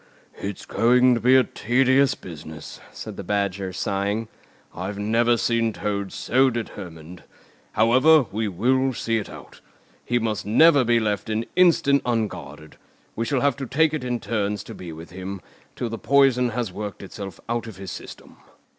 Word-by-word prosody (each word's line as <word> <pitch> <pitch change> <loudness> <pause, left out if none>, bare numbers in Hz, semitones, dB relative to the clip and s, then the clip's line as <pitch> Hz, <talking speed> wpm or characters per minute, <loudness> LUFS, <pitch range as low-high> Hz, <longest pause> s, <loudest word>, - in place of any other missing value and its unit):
"It's 100 -1 -5
going 125 +2 +4
to 120 - 0
be 125 +4 +4
a 130 - +6
tedious 130 +4 +2
business," 80 -2 -10
said 110 -3 -8
the - - -5
Badger, 100 -1 -1
sighing. 100 +4 -2 0.4
"I've 95 +3 -5
never 115 +3 +2
seen 115 -1 +1
Toad 100 -2 -3
so 130 +2 +2
determined. 90 -8 -7 0.5
However, 130 +7 +5
we 110 +1 -1
will 130 +8 +1
see 115 0 0
it 105 - -7
out. - - -13 0.4
He 120 - 0
must 110 -3 -1
never 140 +6 +5
be 120 0 +3
left 105 0 -2
an 110 +1 -1
instant 160 -6 +4
unguarded. 110 -9 -4 0.4
We 115 - -2
shall 130 +1 0
have 140 -3 +2
to 135 -2 -5
take 160 +4 +2
it 155 -4 -3
in 125 -1 -2
turns 105 -3 -2
to - - -9
be 90 -2 -8
with 80 +2 -10
him, 95 +2 -6 0.4
till 120 - -3
the 115 - -5
poison 135 -3 +3
has 115 -4 -3
worked 105 0 -6
itself 95 -1 -8
out 115 0 -2
of 110 -5 -9
his 95 -1 -7
system." - - -10
115 Hz, 170 wpm, -23 LUFS, 100-125 Hz, 0.5 s, a